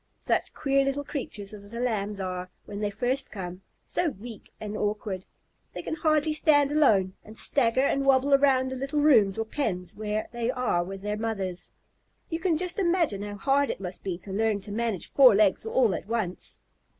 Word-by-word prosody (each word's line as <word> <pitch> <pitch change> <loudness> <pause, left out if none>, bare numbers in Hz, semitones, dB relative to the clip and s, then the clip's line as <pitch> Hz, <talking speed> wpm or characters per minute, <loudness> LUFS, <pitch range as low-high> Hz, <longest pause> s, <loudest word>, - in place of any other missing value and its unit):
Such - - -1
queer 275 -1 +2
little 275 +1 -1
creatures 215 -8 -5
as 200 -1 -11
the 235 +2 -6
Lambs 210 -4 -1
are 185 -1 -4 0.2
when 200 - -7
they 210 -1 0
first 250 +6 -1
come 180 -2 -7 0.2
so 350 - 0
weak 225 -2 -10
and 210 -1 -5
awkward! 205 -3 -2 0.5
They - - -6
can - - -4
hardly 310 -1 +2
stand 290 -2 +3
alone, 210 -12 +3
and 215 +1 -10
stagger 260 0 +2
and 275 0 +1
wobble 275 +1 +4
around 265 -2 +4
the - - -3
little 275 +3 -2
rooms 225 -10 +5
or 225 - -1
pens 190 - -3
where 215 0 -2
they 235 -1 -2
are 250 -9 0
with 195 +2 -8
their 210 0 -2
mothers. 195 -5 -3 0.6
You 325 - -1
can 340 -3 +1
just 360 +4 0
imagine 340 - +1
how 205 0 -5
hard 275 +5 +2
it - - -3
must 185 -1 -6
be 185 -3 -3
to 190 +2 -9
learn 215 0 +1
to 205 - -8
manage 225 -3 -2
four 255 -6 +6
legs 205 +1 +3
all 225 -3 +3
at - - -5
once! 215 -6 -3
225 Hz, 195 wpm, -27 LUFS, 200-275 Hz, 0.6 s, four